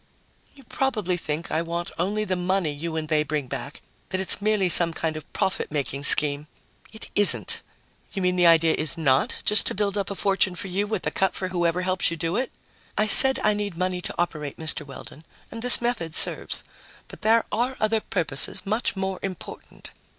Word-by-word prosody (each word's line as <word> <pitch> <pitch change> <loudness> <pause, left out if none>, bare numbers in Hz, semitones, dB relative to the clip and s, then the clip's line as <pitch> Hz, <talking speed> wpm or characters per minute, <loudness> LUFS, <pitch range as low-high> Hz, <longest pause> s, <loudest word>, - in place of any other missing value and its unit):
"You 275 - -16
probably 225 - -1
think 160 -1 -5
I 160 - 0
want 170 +1 -4
only 205 +5 -1
the 190 -3 -2
money 180 -2 -1
you 160 +3 -5
and 155 -1 -3
they 155 -1 +2
bring 150 -2 -2
back, 140 +2 -7 0.3
that 185 - -2
it's 190 +1 +5
merely 210 -2 +1
some 170 -1 +4
sort 160 -1 -2
of 155 -1 -9
profit 190 - -2
making 140 -1 -2
scheme. 145 0 +5 0.4
It 220 - -10
isn't." 205 -1 +2 0.5
"You 195 - -4
mean 180 0 +2
the 175 -1 +4
idea 165 -1 +5
is 155 +2 -2
not 135 -4 +1
just 210 -1 +4
to - - 0
build 205 0 -1
up 195 - -3
a 200 - -5
fortune 195 -2 +1
for 195 - -6
you 200 +3 -1
with 215 -3 -3
a - - -1
cut 190 -1 0
for 185 - -3
whoever 175 0 0
helps 185 0 0
you 170 - -5
do 165 +2 -2
it?" 255 +3 -2 0.5
"I 215 - +2
said 265 +5 +6
I 210 - +3
need 205 -4 -4
money 180 0 -2
to - - -5
operate, 150 -4 -3
Mr. 160 -1 -3
Weldon, 140 +2 -12 0.3
and 230 - -7
this 250 +1 +6
method 230 -10 -2
serves. - - +2 0.4
But - - -13
there 225 +1 +3
are 245 +4 -1
other 215 +1 +1
purposes, 180 -2 -1
much 215 +4 -1
more 190 -1 -3
important. 185 -3 -8
180 Hz, 200 wpm, -24 LUFS, 160-205 Hz, 0.5 s, said